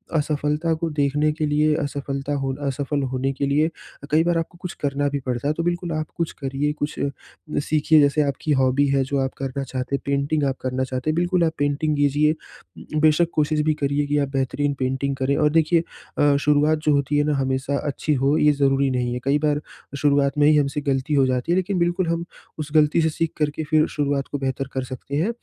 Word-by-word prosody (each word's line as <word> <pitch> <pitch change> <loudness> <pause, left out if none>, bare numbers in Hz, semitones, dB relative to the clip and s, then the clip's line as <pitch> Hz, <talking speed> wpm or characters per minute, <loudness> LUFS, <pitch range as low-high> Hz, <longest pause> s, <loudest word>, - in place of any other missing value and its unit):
असफ़लता 150 +1 0
को 165 +1 -2
देखने 150 0 +1
के 155 0 -2
लिए 150 +1 +2
असफ़लता 140 0 -3
होना 135 +1 -3
असफल 140 +1 -1
होने 130 +1 0
के 140 - -2
लिए 150 +3 +2
अ, 160 -3 -13
कई 160 +2 +4
बार 170 -1 +1
आपको 165 +2 -4
कुछ 180 - -5
करना 145 0 0
भी 140 - -2
पड़ता 125 +2 -2
है। 150 - +2
तो 165 - -3
बिल्कुल 175 0 -2
आप 155 0 -2
कुछ 170 -1 -1
करिए, 135 +2 -1
कुछ 150 -1 -4
अ, 140 - 0 0.5
सीखिए 155 +1 +3
जैसे 145 +1 +3
आपकी 145 +1 -1
हॉबी 130 +2 +3
है 135 -1 +2
जो 140 +2 -2
आप - - -11
करना 135 0 -3
चाहते 130 +1 -3
हैं, - - -4
पेंटिंग 140 +2 0
आप 135 -1 -1
करना 130 0 -1
चाहते 130 +3 -3
हैं, 155 - +1
बिल्कुल 175 +1 +1
आप 160 -1 +1
पेंटिंग 145 +2 0
कीजिए 145 +1 +3 0.6
उम, 155 - +2
बेशक 155 +2 +4
कोशिश 150 0 +1
भी 155 - +4
करिए 140 +1 +1
कि 145 +1 +1
आप 140 -1 0
बेहतरीन 140 +2 0
पेंटिंग 135 +1 -1
करें। 135 +1 0
और 150 - +3
देखिए 165 +1 +2 0.3
अ, 145 -1 +4
शुरुआत 150 +2 +3
जो 150 - +4
होती 140 +1 +1
है 145 - +3
ना, 150 - +1
हमेशा 135 +1 -1
अच्छी 150 +2 -1
हो 145 +3 +3
ये 150 - +5
ज़रूरी 140 -1 +2
नहीं 125 -1 -1
है, 125 - -3
कई 140 +2 +2
बार 150 -1 +1 0.4
शुरुआत 140 0 +2
में 145 0 +5
ही 155 - +5
हमसे 145 0 0
ग़लती 140 +1 -1
हो 135 -2 +4
जाती 130 +4 -1
है, - - +4
लेकिन 185 0 0
बिल्कुल 175 +1 +1
हम 170 +1 -1 0.3
उस 150 -1 -5
ग़लती 155 +2 +4
से 160 - +2
सीख 160 +1 -2
कर 150 -1 +1
के 155 - -5
फिर 155 +1 -2
शुरुआत 140 -2 -1
को 145 - -1
बेहतर 135 0 -2
कर 130 - -2
सकते 130 +2 -7
हैं। 165 +9 +1
145 Hz, 230 wpm, -23 LUFS, 140-155 Hz, 0.6 s, ये